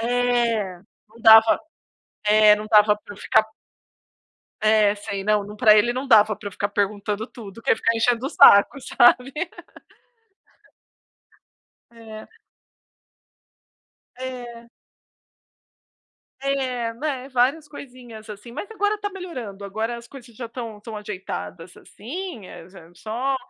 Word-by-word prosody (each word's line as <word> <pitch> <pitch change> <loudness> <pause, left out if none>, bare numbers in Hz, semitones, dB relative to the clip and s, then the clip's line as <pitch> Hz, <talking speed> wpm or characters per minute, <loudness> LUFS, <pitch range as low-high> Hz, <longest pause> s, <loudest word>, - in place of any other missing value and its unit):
É. 235 -5 0 0.3
Não 225 +2 -19
dava 220 0 +7 0.7
eh, 210 0 +6
não 210 0 -7
dava 210 0 +5
pra 205 - -13
eu - - -16
ficar 220 - +2 1.2
é, 215 -1 +3
sei, 200 -1 -6
não 210 0 +1
não 210 +1 -10
pra 215 -1 +6
ele 235 +3 +3
não 255 +2 -4
dava 215 -4 +5
pra 205 - -7
eu - - -14
ficar 200 +2 -2
perguntando 205 +1 -2
tudo, 215 -7 -12
porque 230 - -3
eu - - +7
ia - - +1
ficar 230 +1 0
enchendo 240 +2 +1
o - - -4
saco, 200 +8 +6
sabe. 250 +1 +3 2.6
É. 225 -2 -12 1.9
É. 245 -2 -8 1.7
É, 255 -4 -2
né, 265 0 -4
várias 265 +5 +1
coisinhas, 245 -6 -12
assim, 210 +3 -10
mas 305 - -7
agora 415 -1 0
está 410 -1 -4
melhorando, 255 - -8
agora 220 +4 -4
as 235 0 -12
coisas 245 -2 -14
já 245 - -7
estão 230 -2 -8
estão 210 +2 -10
ajeitadas 190 -4 -7
assim, 260 - -8
eh, 165 - -12
já 175 -3 -16
só 235 +9 -3
230 Hz, 135 wpm, -22 LUFS, 210-250 Hz, 2.6 s, dava